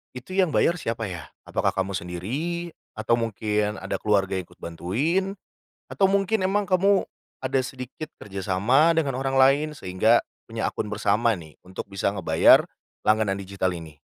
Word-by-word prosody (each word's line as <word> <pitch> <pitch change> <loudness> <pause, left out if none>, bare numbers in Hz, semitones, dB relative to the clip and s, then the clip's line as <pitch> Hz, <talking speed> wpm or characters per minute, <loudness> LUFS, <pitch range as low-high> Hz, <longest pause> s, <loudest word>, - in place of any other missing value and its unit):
itu 125 +9 -9
yang 185 -3 +2
bayar 170 0 +3
siapa, 115 -2 -3
ya? 85 -6 -6 0.2
Apakah - - -1
kamu 95 0 -1
sendiri 135 - -4 0.2
atau 115 +2 +1
mungkin 105 -1 -1
ada 100 0 -4
keluarga 95 -2 +1
ikut 90 - -10
bantuin? 145 - -1 0.5
Atau 195 - +2
mungkin 195 +1 +2
emang 205 +2 +1
kamu 195 +2 +4 0.4
ada 130 0 +1
sedikit 130 +5 -7
kerjasama 105 - +2
dengan 140 -5 0
orang 135 0 -2
lain 135 +3 +5
sehingga 110 0 +2 0.2
punya 115 -1 -2
akun 105 - -4
bersama 105 +2 +2
nih, 80 -5 -10
untuk 95 +1 -8
bisa 100 0 -1
ngebayar - - +5 0.4
langganan 110 -2 +2
digital 95 -1 -2
ini. 80 -3 -9
115 Hz, 150 wpm, -25 LUFS, 95-155 Hz, 0.5 s, lain